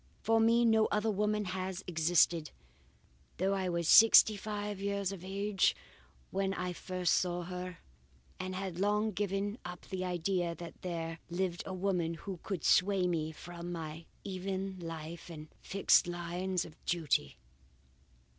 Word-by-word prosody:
For 225 Hz, +1 st, +3 dB
me 230 Hz, +1 st, +4 dB
no 220 Hz, -1 st, +4 dB
other 210 Hz, +1 st, +1 dB
woman 210 Hz, +1 st, 0 dB
has 185 Hz, 0 st, -3 dB
ever -, -, -25 dB
existed, 165 Hz, -1 st, +2 dB, 0.9 s
though 190 Hz, +2 st, +1 dB
I 190 Hz, -2 st, -1 dB
was 170 Hz, -2 st, -1 dB
sixty 220 Hz, +1 st, +8 dB
five 205 Hz, -1 st, -4 dB
years 200 Hz, -1 st, -1 dB
of 190 Hz, -3 st, -8 dB
age 195 Hz, +1 st, +1 dB, 0.6 s
when 195 Hz, 0 st, 0 dB
I 180 Hz, -1 st, -3 dB
first 180 Hz, 0 st, -1 dB
saw 175 Hz, -1 st, 0 dB
her, 180 Hz, 0 st, -6 dB, 0.6 s
and 185 Hz, 0 st, -4 dB
had 185 Hz, -2 st, -4 dB
long 210 Hz, +2 st, +2 dB
given 205 Hz, +2 st, -2 dB
up 180 Hz, 0 st, -7 dB
the 185 Hz, -1 st, -3 dB
idea 175 Hz, -1 st, -1 dB
that 170 Hz, -1 st, -10 dB
there 165 Hz, -2 st, -4 dB
lived 175 Hz, 0 st, -1 dB
a 190 Hz, -, -4 dB
woman 180 Hz, -3 st, 0 dB
who 185 Hz, +1 st, -7 dB
could 190 Hz, -7 st, -4 dB
sway 190 Hz, 0 st, +4 dB
me 160 Hz, -3 st, -1 dB
from 175 Hz, +2 st, -8 dB
my 160 Hz, -1 st, -6 dB, 0.2 s
even 190 Hz, 0 st, -4 dB
life 165 Hz, 0 st, -7 dB
and 155 Hz, -2 st, -9 dB
fixed 195 Hz, -2 st, +3 dB
lines 175 Hz, +1 st, -2 dB
of 155 Hz, -, -15 dB
duty. 155 Hz, -, 0 dB
185 Hz, 150 wpm, -33 LUFS, 170-195 Hz, 0.9 s, sixty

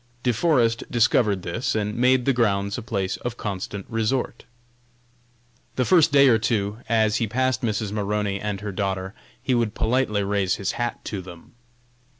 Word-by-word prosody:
De 125 Hz, -, +2 dB
Forest 120 Hz, -4 st, +2 dB
discovered 110 Hz, -5 st, +2 dB
this, 110 Hz, +9 st, -2 dB
and 105 Hz, -1 st, -1 dB
made 125 Hz, +1 st, +3 dB
the 135 Hz, -, +3 dB
grounds 100 Hz, -4 st, +1 dB
a 125 Hz, -, -4 dB
place 100 Hz, -5 st, -2 dB
of 120 Hz, -1 st, -5 dB
constant 100 Hz, -1 st, -5 dB
resort. 115 Hz, +3 st, -2 dB, 1.3 s
The 125 Hz, -, +1 dB
first 165 Hz, -1 st, +5 dB
day 140 Hz, -1 st, +6 dB
or 115 Hz, -3 st, +5 dB
two, 105 Hz, -2 st, -1 dB
as 110 Hz, 0 st, +2 dB
he 115 Hz, -, 0 dB
passed 130 Hz, +3 st, 0 dB
Mrs. 110 Hz, -3 st, -2 dB
Maroney 105 Hz, -1 st, -1 dB
and 105 Hz, -1 st, -4 dB
her 105 Hz, -1 st, -4 dB
daughter, 95 Hz, 0 st, -3 dB, 0.3 s
he 130 Hz, -, -1 dB
would 115 Hz, -3 st, 0 dB
politely 110 Hz, -4 st, +1 dB
raise 100 Hz, -2 st, 0 dB
his 100 Hz, -, -2 dB
hat 120 Hz, -1 st, -4 dB
to 100 Hz, -3 st, -4 dB
them. 90 Hz, -2 st, -13 dB
110 Hz, 165 wpm, -24 LUFS, 100-120 Hz, 1.3 s, day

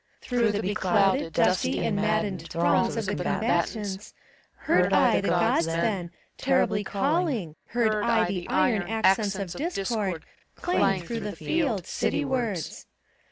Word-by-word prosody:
Through 235 Hz, -4 st, 0 dB
the 210 Hz, -, -2 dB
beclouded, 190 Hz, -3 st, +1 dB
dusty 90 Hz, -, +1 dB
and -, -, 0 dB
maddened 205 Hz, -5 st, -1 dB
Throngs 175 Hz, +8 st, +1 dB
of 225 Hz, -, -2 dB
the 205 Hz, +1 st, -2 dB
combatants, 205 Hz, 0 st, -2 dB, 0.4 s
heard -, -, +2 dB
I -, -, +4 dB
the -, -, -2 dB
Gk>ds 165 Hz, -, +2 dB
then 170 Hz, +2 st, -1 dB, 0.3 s
Terribly 255 Hz, -6 st, +1 dB
calling, 240 Hz, -, -1 dB
heard 220 Hz, -3 st, +1 dB
I 230 Hz, -1 st, +3 dB
the 180 Hz, -3 st, -4 dB
iron 220 Hz, -5 st, +2 dB
Accents 210 Hz, -2 st, +2 dB
of 190 Hz, -3 st, -5 dB
Discord 205 Hz, -, -2 dB, 0.3 s
clang 195 Hz, -, +1 dB
through 230 Hz, +7 st, -4 dB
the 210 Hz, -2 st, -5 dB
field, 260 Hz, -, -1 dB
City 295 Hz, -, -1 dB
wards. 235 Hz, -, -3 dB
205 Hz, 135 wpm, -26 LUFS, 185-230 Hz, 0.4 s, I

